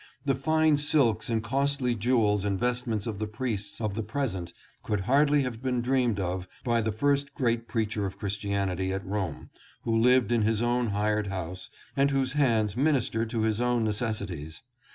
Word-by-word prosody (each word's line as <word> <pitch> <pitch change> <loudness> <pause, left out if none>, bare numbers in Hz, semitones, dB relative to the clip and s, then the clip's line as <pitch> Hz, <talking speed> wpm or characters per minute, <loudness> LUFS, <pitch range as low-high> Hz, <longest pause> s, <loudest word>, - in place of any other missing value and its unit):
The 135 - +3
fine 155 +3 +3
silks 135 -7 +2
and 115 -1 0
costly 135 +1 0
jewels 110 -3 +2
and 100 -2 -1
vestments 120 -3 -1
of 110 -3 -4
the 110 - -2
priests 105 -3 -4
of 110 -3 -1
the 110 - -2
present 105 -7 -3 0.3
could 105 -2 -1
hardly 145 +6 +3
have 120 -3 -4
been 130 -1 0
dreamed 125 -4 +1
of 90 0 -2 0.2
by 120 -1 +2
the 110 0 0
first 140 +5 0
great 115 -3 0
preacher 105 -3 -1
of 95 - -8
Christianity 100 -2 -2
at 95 0 -3
Rome, 95 -5 -4 0.3
who 115 -1 0
lived 125 +1 +4
in 120 -1 +3
his 110 0 +2
own 120 +1 +1
hired 105 0 0
house, 95 -1 -5 0.3
and 140 +1 +3
whose 135 -2 0
hands 115 -8 +2
minis 140 0 +1
tered 115 0 -1
to 115 -1 -1
his 110 +1 +1
own 120 -1 +2
necessities. 100 -8 -3
115 Hz, 180 wpm, -28 LUFS, 105-130 Hz, 0.3 s, lived